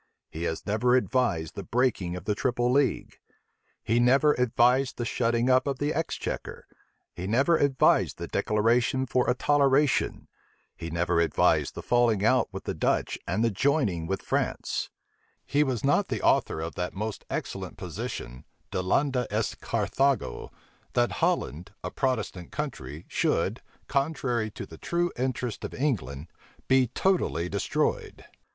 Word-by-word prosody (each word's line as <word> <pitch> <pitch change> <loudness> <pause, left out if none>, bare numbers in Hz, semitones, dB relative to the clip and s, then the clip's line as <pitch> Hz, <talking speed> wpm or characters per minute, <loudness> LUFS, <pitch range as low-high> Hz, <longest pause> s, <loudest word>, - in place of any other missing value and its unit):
He 85 +2 -2 0.2
never 110 +4 +2
advised 120 - +1
the - - -5
breaking 115 -8 0
of 90 - -8
the 105 - +1
triple 120 +2 0
league; 135 -1 0 0.6
he 115 +2 +2
never 135 +5 +5
advised 125 +2 +2
the 120 - -2
shutting 115 0 +1
up 130 +2 +4
of 140 -1 -1
the 145 +2 -1
exchequer; 165 +2 -4 0.5
he 90 - -5
never 135 +10 +3
advised 140 -3 +3
the - - -5
declaration 115 +4 +1
for 125 0 +1
a 125 - +3
toleration; 140 0 +2 0.5
he 85 - -6
never 85 0 +1
advised 85 - +2
the - - -6
falling 115 -4 +2
out - - +3
with - - -7
the - - -3
Dutch - - 0
and 110 - 0
the 115 - +2
joining 105 - +1
with 95 +2 -2
France: - - -1 0.6
he 145 +1 +2
was 130 -6 -2
not 145 +8 +3
the - - -3
author - - +2
of 80 +1 -4
that 90 +1 -4
most 110 +2 -4
excellent - - -4
position, 60 +1 -6 0.3
Delenda 125 +7 +1
est 105 +1 -2
Carthago, 140 -1 0 0.4
that 120 0 +2
Holland, 100 - -1
a - - -4
Protestant 125 -9 -2
country, 85 - -5
should, - - 0 0.3
contrary 135 -6 0
to 105 - -8
the 80 - -13
true 175 0 0
interests 125 -2 -3
of - - -5
England, 80 - -2 0.4
be 130 -1 +4
totally 150 - 0
destroyed. 100 +2 -2
120 Hz, 145 wpm, -27 LUFS, 100-135 Hz, 0.6 s, never